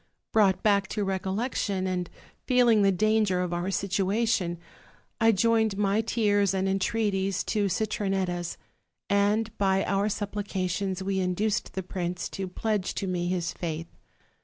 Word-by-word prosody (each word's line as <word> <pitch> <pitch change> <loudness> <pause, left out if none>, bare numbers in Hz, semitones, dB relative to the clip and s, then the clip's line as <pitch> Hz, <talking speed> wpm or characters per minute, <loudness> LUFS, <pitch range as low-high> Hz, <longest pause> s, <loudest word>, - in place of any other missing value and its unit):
Brought 195 -4 +3
back 200 -2 +3
to 210 +1 -2
recollection, 195 +1 -1
and 180 -2 -2 0.4
feeling 245 -4 +5
the 195 -1 +4
danger 215 -1 +2
of 180 -1 -2
our 175 +2 -1
situation, 195 -1 0 0.6
I 225 0 +5
joined 220 0 +2
my 205 +1 +2
tears 205 -4 +1
and 190 0 0
entreaties 195 -1 0
to 210 -2 0
Citronetta's; 190 -4 -1 0.5
and 205 +2 +2
by 195 -1 +2
our 200 +1 +1
supplica 205 -2 -2
tions 190 +1 -2
we 190 0 -1
induced 190 +3 -1
the 190 - -2
prince 180 -1 -3
to 190 -1 -4
pledge 205 +1 -2
to 200 - -2
me 180 -2 -1
his 175 -1 -1
faith. 165 -1 -5
195 Hz, 140 wpm, -27 LUFS, 185-210 Hz, 0.6 s, feeling